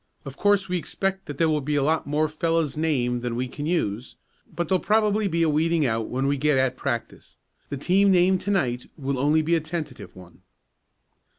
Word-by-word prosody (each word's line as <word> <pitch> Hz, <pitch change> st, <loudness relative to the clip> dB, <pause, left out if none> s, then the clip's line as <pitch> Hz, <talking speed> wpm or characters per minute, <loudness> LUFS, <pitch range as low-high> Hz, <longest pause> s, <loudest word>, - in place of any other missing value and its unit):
Of 135 Hz, -1 st, -8 dB
course 205 Hz, +1 st, +2 dB
we 180 Hz, -1 st, -1 dB
expect 195 Hz, +3 st, -3 dB
that 145 Hz, -, -6 dB
there 165 Hz, -, +3 dB
will 155 Hz, -1 st, +1 dB
be 150 Hz, +2 st, -2 dB
a 145 Hz, -, +2 dB
lot 155 Hz, +2 st, 0 dB
more 150 Hz, +2 st, +1 dB
fellows 165 Hz, -1 st, -1 dB
named 130 Hz, -6 st, 0 dB
than 120 Hz, -1 st, -3 dB
we 125 Hz, +2 st, -2 dB
can 145 Hz, +4 st, -6 dB
use, 125 Hz, -, -2 dB, 0.4 s
but 175 Hz, -1 st, -3 dB
there'll 185 Hz, +1 st, +1 dB
probably 210 Hz, 0 st, +2 dB
be 170 Hz, -2 st, +1 dB
a -, -, +3 dB
weeding 160 Hz, +1 st, +2 dB
out 115 Hz, -2 st, -1 dB
when 130 Hz, +2 st, -2 dB
we 140 Hz, +1 st, +1 dB
get 150 Hz, 0 st, +2 dB
at 130 Hz, -1 st, +1 dB
practice. 120 Hz, -4 st, -5 dB, 0.3 s
The 140 Hz, -, -4 dB
team 195 Hz, +7 st, +3 dB
named 185 Hz, 0 st, +3 dB
to 200 Hz, -, -4 dB
night 125 Hz, -11 st, 0 dB
will 135 Hz, -2 st, -2 dB
only 150 Hz, +3 st, +3 dB
be 165 Hz, +2 st, 0 dB
a 165 Hz, -, +4 dB
tentative 155 Hz, 0 st, -6 dB
one." 90 Hz, -2 st, -15 dB
155 Hz, 210 wpm, -24 LUFS, 130-175 Hz, 0.4 s, a